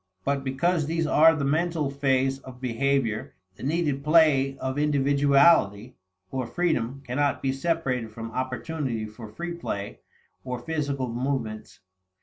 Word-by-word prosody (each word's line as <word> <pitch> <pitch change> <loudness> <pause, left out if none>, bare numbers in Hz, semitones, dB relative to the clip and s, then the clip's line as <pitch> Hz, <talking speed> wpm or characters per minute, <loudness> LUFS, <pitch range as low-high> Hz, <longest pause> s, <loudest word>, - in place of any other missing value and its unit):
But 140 -1 0
because 155 +4 0
these 165 0 0
are 160 +1 +6
the 145 -2 -1
mental 155 0 0
phase 135 -1 +1
of 130 -2 -12
behavior, 125 -2 -1 0.2
the - - -15
needed 145 -1 -1
play 150 -4 +4
of 130 +2 -3
individuality 140 -5 +3 0.4
or 130 -2 -2
freedom 135 -5 -1
cannot 140 +3 0
be 135 - +1
separated 135 -5 -1
from 115 +1 -7
opportunity 130 -1 -3
for 110 +1 -10
free 170 +10 -5
play 100 -12 -5 0.4
of 125 -2 -5
physical 140 -5 -2
movements. 120 -4 -3
135 Hz, 130 wpm, -26 LUFS, 125-150 Hz, 0.4 s, are